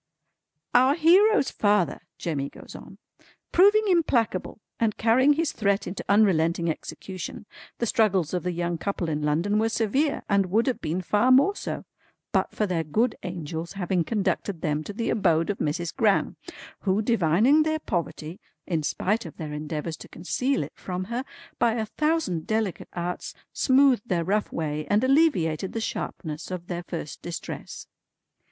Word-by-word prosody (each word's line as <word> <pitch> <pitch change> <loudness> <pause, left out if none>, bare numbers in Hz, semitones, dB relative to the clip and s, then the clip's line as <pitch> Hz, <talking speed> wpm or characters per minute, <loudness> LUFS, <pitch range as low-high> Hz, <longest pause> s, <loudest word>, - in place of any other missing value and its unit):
"Our 260 +3 +5
hero's 360 +3 +5
father" 205 -4 +1 0.2
Jemmy 140 -5 -3
goes - - -13
on - - -11 0.5
"proving 410 +4 +5
implacable 250 - +1 0.2
and 225 -2 +1
carrying 255 +6 +4
his 320 +1 0
threat 200 -1 0
into 185 +2 -5
unrelenting 170 -5 +3
execution, 185 +4 -7 0.3
the 235 - -1
struggles 195 -8 +2
of 180 - 0
the 180 - -2
young 170 -1 -2
couple 185 -3 -2
in 150 -1 -2
London 165 +8 +1
were 225 +1 +2
severe, 250 +7 0
and 200 -2 +2
would 215 +6 +2
have 260 -3 -1
been 170 +4 -2
far 210 +7 +2
more 280 +11 +5
so, - - -5 0.5
but - - +1
for 215 - -1
their 175 -4 -1
good 220 +10 +1
angel's 170 -2 -5
having 180 -2 0
conducted 195 -3 -1
them 150 -2 -1
to - - -5
the 230 +3 -2
abode 170 -4 +2
of 200 - -7
Mrs. 160 +3 -2
Gran; 220 -6 +2 0.4
who, 200 +2 0
divining 225 - +4
their 315 0 +1
poverty 175 - -4 0.3
(in 165 -3 -1
spite 190 +6 -1
of 160 - -12
their 150 -2 -5
endeavours 150 +1 -4
to - - -11
conceal 255 - -1
it - - -9
from 180 0 -5
her), 250 +2 -1 0.4
by 235 -1 +3
a 220 -1 -1
thousand 300 - -1
delicate 220 -4 -1
arts 175 0 -4 0.2
smoothed 260 -4 +3
their 170 -2 +1
rough 205 +5 0
way, 155 -1 -3
and 210 +3 +3
alleviated 260 - +2
the 225 - -2
sharpness 160 -7 -5
of 180 -2 -5
their 175 -1 -4
first 170 -4 -7
distress." 170 -1 -7
195 Hz, 160 wpm, -26 LUFS, 170-235 Hz, 0.5 s, Our